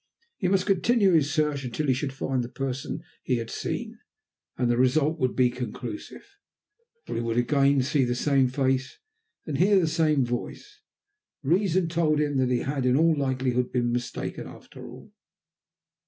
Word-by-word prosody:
He 185 - -1
must 190 0 +2
continue 200 +1 +3
his 155 -4 +3
search 150 -2 0
until 125 +5 -3
he 135 - +3
should 135 +2 -3
find 135 -1 -2
the 120 - -6
person 135 0 -4 0.2
he 125 - 0
had 115 -1 -5
seen, - - -4 0.6
and 125 - +1
the 120 - +2
result 145 +6 +2
would 130 -2 0
be 125 -1 +3
conclusive, 125 - -7 0.8
for - - -6
he - - -1
would 115 0 -2
again 140 +2 +3
see 140 +1 +1
the 120 -1 0
same 135 0 +2
face 130 0 -1 0.5
and 145 -3 -3
hear 195 +2 +5
the 175 - +2
same 155 -4 +2
voice. 415 - -6 0.6
Reason 180 +3 +2
told 160 -2 +1
him 145 -2 0
that 130 -1 +2
he 125 -1 +1
had 135 -1 -2
in 125 - +3
all 165 +1 +4
likelihood 130 -3 -1
been 120 -1 0
mistaken 120 0 -4
after - - -12
all. - - -13
135 Hz, 170 wpm, -26 LUFS, 125-160 Hz, 0.8 s, hear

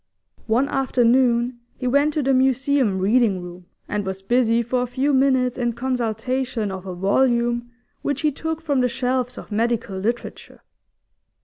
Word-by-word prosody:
One 240 +5 +2
afternoon 245 -2 +2 0.2
he 255 - -6
went 285 +4 +2
to 305 - +1
the 270 +1 +2
Museum 265 -4 +2
Reading 205 0 +2
room, 175 0 -11 0.2
and 210 0 -2
was 190 0 -5
busy 235 +1 +2
for 245 +2 -1
a 250 - -1
few 265 +4 0
minutes 260 -2 +2
in 240 -1 0
consultation 245 -2 -2
of 190 0 -7
a 185 - -5
volume 240 +4 +1 0.3
which 285 -1 -2
he 305 -1 +2
took 320 +3 -4
from 285 -4 +1
the 250 - +2
shelves 250 0 -1
of - - -10
medical 230 -2 -1
literature. 235 +5 -4
245 Hz, 155 wpm, -22 LUFS, 225-265 Hz, 0.3 s, One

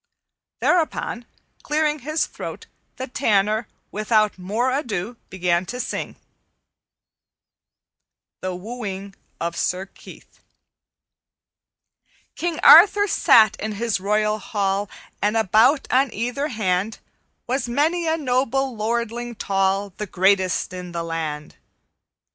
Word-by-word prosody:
Thereupon, 315 -8 0 0.3
clearing 300 0 0
his 305 +5 -1
throat, - - -8 0.3
the 260 - -5
Tanner, 215 -3 +1 0.2
without 215 -1 +1
more 220 +8 -1
ado, 235 -5 -3
began 175 -2 0
to 250 - -5
sing: - - -4 2.3
THE 185 -1 -3
WOOING 200 -1 -6 0.3
OF 170 0 -3
SIR 185 +2 -1
KEITH - - -16 2.0
"_King 340 -1 -2
Arthur 410 +5 +8
sat 220 - +5
in 215 0 -3
his 225 0 -1
royal 210 +2 0
hall, 200 -1 -1 0.3
And 210 +2 +1
about 225 - +4
on 260 0 +3
either 245 +7 -2
hand 210 -3 -1 0.5
Was 255 0 -2
many 320 +7 +1
a 320 0 +1
noble 265 -2 0
lordling 235 +2 -2
tall, 195 0 0
The 210 - -4
greatest 190 0 +1
in 180 -1 -7
the 170 -1 -3
land. 155 -3 -5
215 Hz, 105 wpm, -22 LUFS, 195-255 Hz, 2.3 s, Arthur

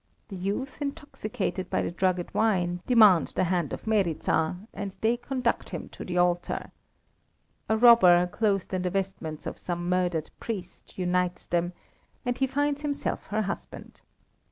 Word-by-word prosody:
The 195 - -6
youth, 205 +11 -3
intoxicated 215 -9 -4
by - - 0
the - - -2
drugged 180 0 0
wine, 180 -5 +1
demand 215 -8 +6
the - - +2
hand 175 -4 0
of - - -6
Meryza, 175 -5 +1 0.2
and 195 -1 -5
they 225 +2 +3
conduct 250 -1 -2
him - - -6
to - - -9
the 180 0 -3
altar. 175 0 0 1.0
A 220 - +3
robber, 190 -7 +7
clothed 195 0 -1
in 185 - 0
the 180 - 0
vestments 185 -5 -3
of - - -5
some 175 -1 -3
murdered 180 -3 0
priest, 190 -6 -7
unites 180 -1 0
them, 175 +1 0 0.5
and 245 0 0
he 265 +1 +1
finds 285 +2 0
himself 290 -1 -3
her 215 +1 0
husband. 195 - -7
190 Hz, 155 wpm, -27 LUFS, 175-225 Hz, 1.0 s, robber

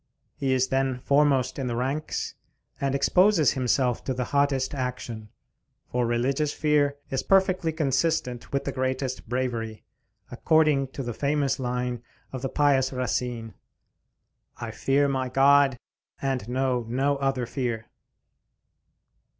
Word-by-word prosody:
He 135 -1 -1
is 130 0 +1
then 135 -1 0
foremost 140 0 +2
in 130 - -2
the 120 - -2
ranks, 135 +6 -2 0.5
and 140 0 0
exposes 180 +1 +4
himself 125 -1 0
to 130 - -1
the 125 - -1
hottest 140 -2 +1
action; 125 -5 -4 0.6
for 125 -1 +1
religious 130 +5 0
fear 145 -2 +2 0.2
is 135 - 0
perfectly 185 -3 +2
consistent 135 -4 -1
with 140 0 0
the - - -2
greatest 130 -2 -3
bravery, 120 -3 -2 0.5
according 155 -4 +3
to 135 - -4
the 120 -1 -4
famous 140 +1 0
line 125 -1 -2 0.3
of 130 - -4
the 135 - -2
pious 140 -2 +2
Racine, 125 -3 -2 1.0
"I - - -5
fear 140 +1 +2
my 130 -2 -1
God, 135 0 +4 0.4
and 130 -5 -2
know 130 -1 0
no 135 +4 +1
other 135 -2 0
fear." 120 -3 -3
130 Hz, 130 wpm, -26 LUFS, 125-140 Hz, 1.0 s, exposes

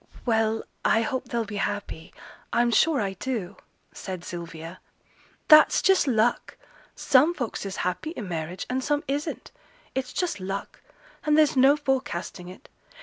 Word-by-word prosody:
'Well, 225 -2 +1 0.2
I 225 - +3
hope 260 -2 -3
they'll 235 -1 -2
be 205 0 -6
happy; 200 -5 -4 0.4
I'm 240 0 +2
sure 305 +5 +3
I 195 -1 -2
do!' 205 -3 -4 0.4
said 185 -3 -7
Sylvia. 170 0 -8 0.7
'That's 305 0 +7
just 385 -6 +4
luck. 235 -1 +1 0.4
Some 295 +6 +4
folks 240 -7 -4
is 190 - -5
happy 180 - -2
i' - - -3
marriage, 175 -2 -5
and 260 +1 -2
some 295 +2 0
isn't. 290 +3 -3 0.4
It's 265 -1 -3
just 360 - -2
luck, 195 +1 -6 0.4
and 300 0 +3
there's 305 -2 +4
no 270 +3 +5
forecasting 265 -9 -3
it. 185 - -13
235 Hz, 145 wpm, -26 LUFS, 190-280 Hz, 0.7 s, That's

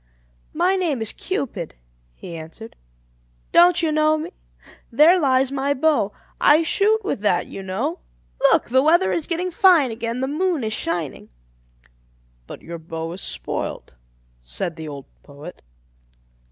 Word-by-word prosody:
"My 360 +4 +2
name 335 -9 -1
is 220 -1 -1
Cupid," 240 - -4 0.4
he 170 - -9
answered. 165 +8 -10 0.8
"Don't 350 0 +5
you 320 - +1
know 310 0 +3
me? 320 +3 -6 0.6
There 315 +9 +6
lies 265 -3 +2
my 280 +1 0
bow. 285 -8 +1 0.3
I 305 +3 +5
shoot 420 +5 +2
with 395 - -2
that, 200 -4 +1
you 195 - -8
know. 190 0 -3 0.5
Look, - - +2
the 260 +2 +3
weather 340 +6 +3
is 335 - -2
getting 360 +1 -2
fine 340 -8 +4
again 230 +2 -4
the 265 - -1
moon 320 0 -1
is 220 -1 -2
shining." 165 - -4 1.2
"But - - -10
your 170 0 -7
bow 165 0 -6
is 185 +3 -8
spoilt," - - -5 0.5
said - - -5
the 160 -1 -8
old 140 -2 -8 0.2
poet. 145 +4 -12
265 Hz, 145 wpm, -22 LUFS, -, 1.2 s, There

